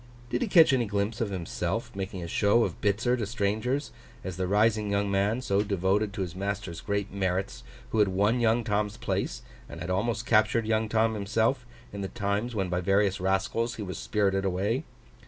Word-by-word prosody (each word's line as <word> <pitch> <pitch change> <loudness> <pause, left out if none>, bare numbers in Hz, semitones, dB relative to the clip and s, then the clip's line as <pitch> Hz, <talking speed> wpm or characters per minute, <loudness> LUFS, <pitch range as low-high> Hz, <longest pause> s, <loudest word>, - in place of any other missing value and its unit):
Did - - 0
he 245 - +1
catch 165 -7 +6
any 125 -3 +2
glimpse 100 +3 -1
of 110 - 0
himself 90 -1 -3
making 95 -2 -4
a - - -5
show 105 +6 +3
of - - -4
Bitzer 110 +4 +2
to 110 - -2
strangers, 115 +6 -1 0.3
as 95 -1 -5
the 95 0 -2
rising 105 +1 +2
young 100 0 0
man, 100 +5 +1
so 100 -4 +1
devoted 100 +1 +1
to 100 - -4
his 90 -2 -4
master's 100 -3 -4
great 100 -1 -2
merits, 95 -1 -2 0.3
who 110 - +1
had 105 - +5
won 100 +6 +2
young 115 0 +2
Tom's 105 -1 -1
place, - - -2 0.3
and - - -8
had 85 +2 -4
almost 110 +4 -1
captured 110 0 +3
young 110 0 +1
Tom 110 0 +2
himself, 115 +4 0 0.3
in 100 - -5
the 95 - -2
times 100 +5 -2
when 95 -3 0
by 90 0 -1
various 100 +1 +2
rascals 95 +5 0
he 110 - -5
was 95 -2 -5
spirited 100 -2 +1
away? 100 - 0
100 Hz, 195 wpm, -28 LUFS, 95-110 Hz, 0.3 s, catch